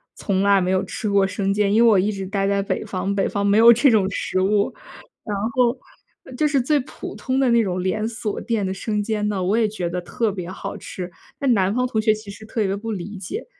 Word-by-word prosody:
从 190 -2 -1
来 200 -1 +5
没 185 0 0
有 190 0 +1
吃 210 +3 -4
过 200 -1 +3
生 195 0 -1
煎， 205 0 +1
因 220 - +4
为 - - +7
我 210 - +5
一 195 +3 +2
直 195 -2 -5
待 195 0 -1
在 200 0 +1
北 195 - -2
方， 200 -1 -3
北 195 - +1
方 200 0 -1
没 200 +1 +3
有 230 +1 +9
这 240 +4 +5
种 215 -5 +3
食 185 -1 -1
物。 200 +1 +1 0.5
然 210 -2 -3 0.2
后 250 0 +2 0.6
就 305 - +2
是 290 -2 +2
最 295 +5 +2
普 250 - -9
通 260 0 -1
的 265 -2 +3
那 235 -1 +4
种 185 -2 -2
连 190 +4 -1
锁 220 -2 -4
店 225 -4 -1
的 190 - -2
生 210 +2 -2
煎 210 0 -2
呢， 200 -3 -2
我 190 +5 +1
也 230 - +3
觉 185 -5 -3
得 180 +1 -3
特 220 +6 -1
别 180 -2 -6
好 - - -6
吃。 180 -1 -7 0.3
但 275 -3 +3
南 195 -2 +2
方 250 +1 +1
同 220 -3 -1
学 215 0 +3
其 215 -1 -9
实 210 +2 -10
特 215 0 -1
别 195 0 0
不 225 +3 -5
理 200 0 -5
解。 200 - -6
205 Hz, 275 characters per minute, -22 LUFS, 195-225 Hz, 0.6 s, 有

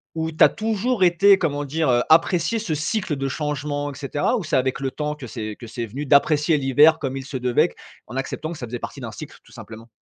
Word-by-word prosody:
ou 160 0 -2
tu 155 - +3
as - - +8
toujours 220 0 -1
été 190 +3 +5
comment 145 -3 -1
dire, 155 +1 -1
heu, 120 -1 +3
apprécié 170 +6 +3
ce 175 -8 -2
cycle 155 +2 -2
de 135 0 -3
changement 145 0 -3
et - - -11
cetera? 145 - -1
Ou 200 - -4
c'est 155 - -1
avec 130 0 0
le 135 -1 -2
temps 150 +1 -3
que 140 - -9
c'est 110 -3 -6
que 120 - -9
c'est 115 +1 -5
venu, 140 +8 -6
d'apprécier 150 +3 +3
l'hiver 145 +4 +4
comme 135 -2 -3
il 135 - -7
se 135 - -8
devait 125 -1 +2
q - - -19 0.3
en 120 - -9
acceptant 150 +4 -4
que 170 - -7
ça 120 - -6
faisait 120 +2 -5
partie - - -7
d'un - - -6
cycle - - -10
tout - - -21
simplement? 115 +1 -11
145 Hz, 250 wpm, -22 LUFS, 135-160 Hz, 0.3 s, as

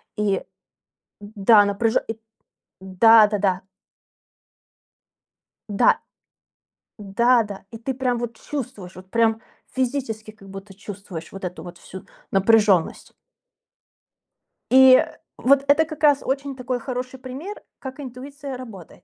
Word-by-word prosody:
и 205 -2 0 0.8
да, 205 0 +4
напряжённая, 205 +3 0
и, 225 0 -5 0.6
да 210 +4 +6
да-да. 200 -3 0 2.1
Да. 200 - +3 1.0
Да 235 +4 +2
да. 200 -2 -8
И 225 - -8
ты 250 +4 -4
прям 250 -1 -1
вот 235 -1 -5
чувствуешь, 250 -10 -7
вот 185 0 -13
прям 225 -1 +2 0.3
физически 245 -5 -3
как 200 -2 -16
будто 195 +1 -10
чувствуешь 195 -4 -9
вот 195 - -10
эту 180 -1 -6
вот 175 -1 -10
всю 190 +1 -11 0.3
напряжённость. 200 -3 +2 1.6
И 260 0 +8 0.4
вот 275 +1 +3
это 290 +3 +4
как 310 0 -10
раз 290 -2 +4
очень 275 +1 -3
такой 250 -1 -3
хороший 255 +1 -6
пример, 275 +11 -8 0.2
как 265 +1 -8
интуиция 275 +1 -8
работает. 220 -9 -12
225 Hz, 115 wpm, -22 LUFS, 200-260 Hz, 2.1 s, И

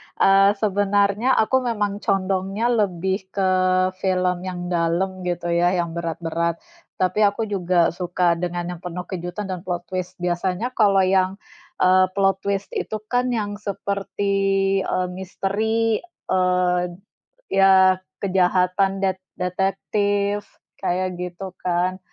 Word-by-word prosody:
Eee, 195 +1 +5
sebenarnya 205 +4 +2
aku 260 +4 +3
memang 210 -5 -1
condongnya 195 +4 0
lebih 190 -3 0
ke 190 -2 +2 0.5
film 185 -1 0
yang 175 -1 -5
dalam, 175 +3 0
gitu 175 -1 -2
ya, 175 +2 +2
yang 170 -2 -1
berat-berat, 170 0 -2 0.4
tapi 185 +2 0
aku 205 +3 -1
juga 180 -5 +1
suka 175 0 0
dengan 175 0 -2
yang 175 - -7
penuh 180 +1 -6
kejutan 185 +2 -5
dan 185 - -3
plot 175 -1 -4
twist. 185 -1 -4
Biasanya 180 +6 -1
kalau 200 -5 +4
yang, 185 0 +2 0.5
eee, 185 0 +5
plot 195 -1 +2
twist 200 0 -3
itu - - -3 0.2
kan 245 +1 +2
yang 205 -2 -3
seperti, 200 -1 -3 0.5
eee, 185 0 0
misteri, 215 +4 -1 0.3
eee, 180 -1 +2 0.7
ya 190 -1 +5 0.2
kejahatan 190 +1 +2
det 190 -1 0 0.2
detektif, 200 +2 -1 0.3
kayak 185 -1 -1
gitu, 180 +1 -6
kan. 180 +1 0
190 Hz, 120 wpm, -22 LUFS, 180-200 Hz, 0.7 s, Eee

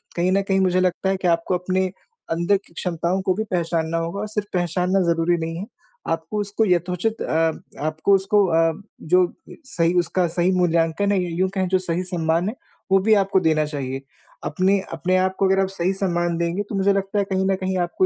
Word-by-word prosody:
कहीं 175 +2 +1
न 195 +1 +3
कहीं 195 -1 +1
मुझे 185 -1 +2
लगता 185 +1 0
है 195 - +1
कि 180 - +1
आपको 170 +1 +1
अपने 185 +1 0 0.5
अंदर 170 +5 +2
की 190 -3 -21
क्षमताओं 175 +2 -1
को 185 -1 +1
भी 215 - -2
पहचानना 165 -2 0
होगा 165 +4 -3
और 215 - -3
सिर्फ 210 -1 -3
पहचानना 180 +2 +1
ज़रूरी 170 +1 +1
नहीं 165 0 -4
है। 190 - -5 0.4
आपको 165 +6 -2
उसको 205 +2 0
यथोचित 180 +4 0
अ, 160 0 +1 0.3
आपको 155 +5 +1
उसको 200 +1 +3
अ, 165 +2 +2 0.2
जो 180 +2 +2 0.3
सही 170 -10 +1
उसका 175 +1 +1
सही 175 +2 +1
मूल्यांकन 170 +3 +2
है 190 -2 +2
या 175 - -3
यूँ 185 0 +2
कहें 190 -1 +1
जो 185 +1 +2
सही 180 -1 -2
सम्मान 170 +1 0
है, 225 - -6 0.4
वो 195 - +6
भी 220 +3 +3
आपको 195 -2 +3
देना 160 -3 +2
चाहिए। 135 -3 -4 0.4
अपने 185 +5 +2
अपने 180 +3 0
आप 185 0 +1
को 195 - +3
अगर 195 0 +3
आप 195 - +2
सही 190 0 -1
सम्मान 175 -3 -1
देंगे, 170 +4 -1
तो 205 - -6
मुझे 195 +1 +3
लगता 195 +1 -1
है 200 - +3
कहीं 190 0 +1
न 195 0 +2
कहीं 190 0 -2
आपको 175 +1 +1
185 Hz, 215 wpm, -22 LUFS, 170-195 Hz, 0.5 s, वो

